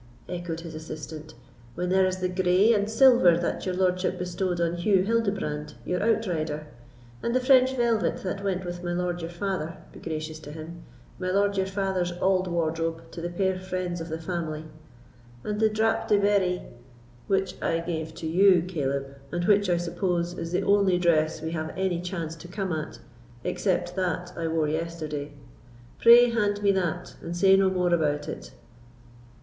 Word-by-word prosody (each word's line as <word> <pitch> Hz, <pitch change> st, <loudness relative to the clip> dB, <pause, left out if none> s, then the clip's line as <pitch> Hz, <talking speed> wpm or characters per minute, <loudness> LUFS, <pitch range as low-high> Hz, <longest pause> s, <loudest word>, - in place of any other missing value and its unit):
echoed 175 Hz, -2 st, -4 dB
his 165 Hz, -1 st, -8 dB
assistant; 155 Hz, 0 st, -8 dB, 0.4 s
"when 180 Hz, +1 st, -2 dB
there 190 Hz, 0 st, +4 dB
is 185 Hz, 0 st, -2 dB
the 185 Hz, -, +1 dB
grey 185 Hz, +4 st, +3 dB
and 205 Hz, -1 st, +1 dB
silver 225 Hz, -7 st, +6 dB
that 175 Hz, +2 st, -2 dB
your 185 Hz, -, -1 dB
lordship 185 Hz, 0 st, +1 dB
bestowed 180 Hz, 0 st, -2 dB
on 170 Hz, 0 st, +1 dB
Hew 185 Hz, +1 st, +3 dB
Hildebrand, 200 Hz, -9 st, -1 dB
your 180 Hz, 0 st, -1 dB
outrider; 170 Hz, -9 st, 0 dB, 0.6 s
and 235 Hz, -, -1 dB
the -, -, +4 dB
French 260 Hz, 0 st, +5 dB
velvet 235 Hz, -3 st, +1 dB
that 195 Hz, +1 st, -3 dB
went 190 Hz, -2 st, -1 dB
with 175 Hz, 0 st, -6 dB
my 175 Hz, 0 st, -2 dB
lord 175 Hz, 0 st, -2 dB
your 165 Hz, -, -4 dB
father—be 175 Hz, -2 st, -5 dB
gracious 155 Hz, -1 st, -5 dB
to 145 Hz, -, -10 dB
him!—my 170 Hz, +3 st, -9 dB
lord 200 Hz, +1 st, +2 dB
your 190 Hz, -1 st, 0 dB
father's 190 Hz, -2 st, -1 dB
auld 185 Hz, +1 st, +1 dB
wardrobe 165 Hz, -1 st, -2 dB
to 170 Hz, -, -7 dB
the 175 Hz, -, -3 dB
puir 190 Hz, +1 st, 0 dB
friends 185 Hz, -2 st, -3 dB
of 165 Hz, -, -6 dB
the 160 Hz, -, -3 dB
family; 160 Hz, -2 st, -4 dB, 0.8 s
and 210 Hz, 0 st, -3 dB
the 220 Hz, 0 st, +4 dB
drap 220 Hz, +1 st, +1 dB
de 210 Hz, -, +4 dB
Berry——" 200 Hz, -3 st, +2 dB, 0.6 s
"Which 195 Hz, -1 st, +1 dB
I 165 Hz, -, +1 dB
gave 160 Hz, -2 st, -4 dB
to 160 Hz, -, -5 dB
you, 180 Hz, +1 st, +5 dB
Caleb, 140 Hz, -6 st, -1 dB, 0.3 s
and 175 Hz, 0 st, -1 dB
which, 205 Hz, -1 st, +4 dB
I 175 Hz, -, +3 dB
suppose, 175 Hz, 0 st, -1 dB
is 165 Hz, -1 st, -5 dB
the 180 Hz, -, 0 dB
only 200 Hz, -3 st, +3 dB
dress 160 Hz, -2 st, +2 dB
we 160 Hz, -, -3 dB
have 160 Hz, 0 st, -4 dB
any 185 Hz, -2 st, 0 dB
chance 170 Hz, -3 st, -4 dB
to 170 Hz, -, -11 dB
come 190 Hz, +1 st, -3 dB
at, 150 Hz, -8 st, -4 dB, 0.5 s
except 180 Hz, -2 st, -1 dB
that 180 Hz, -1 st, -2 dB
I 165 Hz, -1 st, -2 dB
wore 160 Hz, -1 st, +1 dB
yesterday; 155 Hz, -2 st, -4 dB, 0.7 s
pray, 240 Hz, +1 st, +8 dB
hand 205 Hz, -2 st, 0 dB
me 200 Hz, -, +5 dB
that, 180 Hz, -2 st, -2 dB
and 170 Hz, +1 st, -5 dB
say 195 Hz, +1 st, +6 dB
no 195 Hz, 0 st, +4 dB
more 180 Hz, -2 st, +1 dB
about 150 Hz, -3 st, +1 dB
it." -, -, -6 dB
180 Hz, 175 wpm, -26 LUFS, 165-195 Hz, 0.8 s, pray